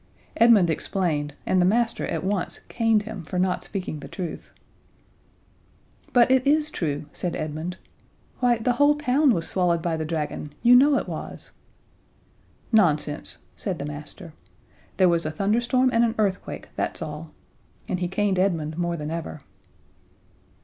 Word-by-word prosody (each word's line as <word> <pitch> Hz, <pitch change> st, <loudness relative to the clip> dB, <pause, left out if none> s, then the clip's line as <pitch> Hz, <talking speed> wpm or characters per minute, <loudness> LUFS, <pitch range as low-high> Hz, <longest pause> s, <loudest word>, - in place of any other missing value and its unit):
Edmund 220 Hz, -7 st, +5 dB
explained, 155 Hz, -4 st, -1 dB
and 185 Hz, -, +2 dB
the -, -, +4 dB
master 230 Hz, +4 st, +1 dB
at -, -, -3 dB
once 190 Hz, -1 st, -2 dB
caned 225 Hz, -2 st, +2 dB
him 220 Hz, +1 st, -7 dB
for 170 Hz, +3 st, -5 dB
not 180 Hz, 0 st, 0 dB
speaking 185 Hz, -6 st, -5 dB
the -, -, -9 dB
truth. 180 Hz, -5 st, -6 dB, 1.6 s
"But 245 Hz, 0 st, +5 dB
it 260 Hz, -1 st, +5 dB
is 305 Hz, +1 st, +3 dB
true," 150 Hz, -3 st, -3 dB
said 175 Hz, -2 st, -3 dB
Edmund. 155 Hz, +4 st, -4 dB, 0.6 s
"Why, 245 Hz, -1 st, +3 dB
the 225 Hz, +2 st, 0 dB
whole 290 Hz, +4 st, +4 dB
town 290 Hz, 0 st, +3 dB
was 165 Hz, -7 st, 0 dB
swallowed 175 Hz, -3 st, +1 dB
by 165 Hz, -2 st, -1 dB
the 160 Hz, -, -2 dB
dragon. 150 Hz, -2 st, -4 dB
You 245 Hz, +1 st, +7 dB
know 280 Hz, +3 st, +6 dB
it -, -, -3 dB
was -, -, -7 dB, 0.6 s
" -, -, -35 dB
"Nonsense," 150 Hz, -4 st, 0 dB
said 190 Hz, -4 st, -3 dB
the 140 Hz, -, -5 dB
master. 150 Hz, +3 st, -8 dB, 0.6 s
"There 185 Hz, -, +5 dB
was 170 Hz, -1 st, +2 dB
a 155 Hz, -, -1 dB
thunderstorm 235 Hz, +9 st, +1 dB
and 230 Hz, -, +4 dB
an 230 Hz, -1 st, +1 dB
earthquake, 200 Hz, -3 st, -2 dB
that's -, -, -2 dB
all." 155 Hz, +1 st, -7 dB, 0.6 s
And 180 Hz, -, -2 dB
he 180 Hz, -, -1 dB
caned 195 Hz, 0 st, 0 dB
Edmund 165 Hz, -4 st, 0 dB
more 170 Hz, -1 st, -1 dB
than 150 Hz, 0 st, -5 dB
ever. 165 Hz, -2 st, -5 dB
185 Hz, 155 wpm, -24 LUFS, 160-230 Hz, 1.6 s, You